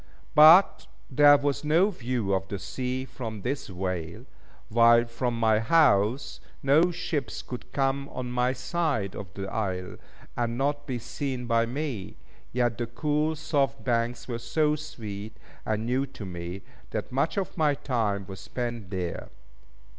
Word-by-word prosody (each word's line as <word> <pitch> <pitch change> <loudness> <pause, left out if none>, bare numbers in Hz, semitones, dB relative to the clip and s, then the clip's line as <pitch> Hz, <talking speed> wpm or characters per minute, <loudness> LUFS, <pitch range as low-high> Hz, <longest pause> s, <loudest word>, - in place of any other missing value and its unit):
But 160 +6 +7 0.2
there 145 +2 +7
was 140 0 -1
no 165 +7 +3
view 120 - -2
of 95 0 -1
the 100 - -4
sea 130 +6 -3
from 115 -5 -7
this 135 +3 -2
vale, 90 +2 -4 0.4
while 115 +1 +5
from 120 0 -2
my 110 -1 +4
house, 115 -2 +3 0.2
no 150 +6 +5
ships 135 - -3
could 125 - -8
come 140 0 0
on 125 -1 -5
my 125 +1 +1
side 130 - -1
of 95 -4 -7
the 95 -1 -4
isle, 95 -3 -3 0.4
and 120 -1 -1
not 145 +2 -1
be 130 -3 -2
seen 125 +1 -4
by 115 -1 +2
me; 125 - -4 0.3
yet 120 -2 0
the 120 - -1
cool, 150 +3 0
soft 145 -3 0
banks 120 -1 -1
were 120 -2 -3
so 150 +6 +1
sweet 110 -9 -7 0.3
and 110 0 -1
new 130 +3 0
to 120 -6 -9
me 90 +1 -6 0.3
that 110 +2 -4
much 140 +8 0
of 190 -2 -2
my 150 -4 +2
time 110 -8 -1
was 95 -1 -9
spent 120 -1 -5
there. 90 -2 -4
120 Hz, 155 wpm, -27 LUFS, 110-140 Hz, 0.4 s, But